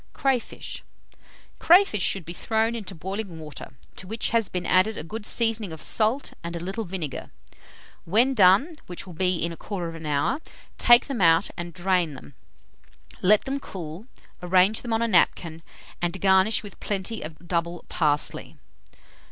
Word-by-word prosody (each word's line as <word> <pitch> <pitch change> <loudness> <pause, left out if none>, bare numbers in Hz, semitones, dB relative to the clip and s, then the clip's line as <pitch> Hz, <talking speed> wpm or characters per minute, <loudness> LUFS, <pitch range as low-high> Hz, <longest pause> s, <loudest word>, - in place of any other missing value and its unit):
CRAYFISH. 265 -3 -2 0.3
246. - - -28 0.4
Crayfish 345 - +5
should 185 -1 0
be 170 - -7
thrown 220 +4 0
into 205 -4 -6
boiling 190 +1 -5
water, 150 -4 -9 0.2
to 185 - -8
which 220 +3 -2
has 230 -3 +1
been 180 -1 -4
added 185 +4 +3
a - - -5
good 215 +6 -3
seasoning 225 -5 +2
of 160 - -8
salt 225 - +1
and 170 0 -5
a - - -4
little 195 +6 -4
vinegar. 170 -7 -5 0.8
When 230 +10 +3
done, 205 - +5
which 175 +1 -6
will 180 - -10
be 180 +2 +1
in 170 0 -2
1/4 165 -4 -6
hour, 150 - 0 0.4
take 240 0 +6
them 265 -7 -4
out 165 +2 +4
and 175 -1 -6
drain 180 -4 0
them. 140 - -13 0.9
Let 205 +3 +4
them 275 +1 -2
cool, 180 - -8 0.3
arrange 185 +4 +3
them 240 - -6
on 225 +1 +1
a - - +1
napkin, 170 -4 +2 0.4
and 175 +2 -2
garnish 190 +3 +3
with 205 - -11
plenty 210 +2 -3
of 155 0 -7
double 170 0 -2
parsley. 150 -3 -1
190 Hz, 160 wpm, -25 LUFS, 170-220 Hz, 0.9 s, take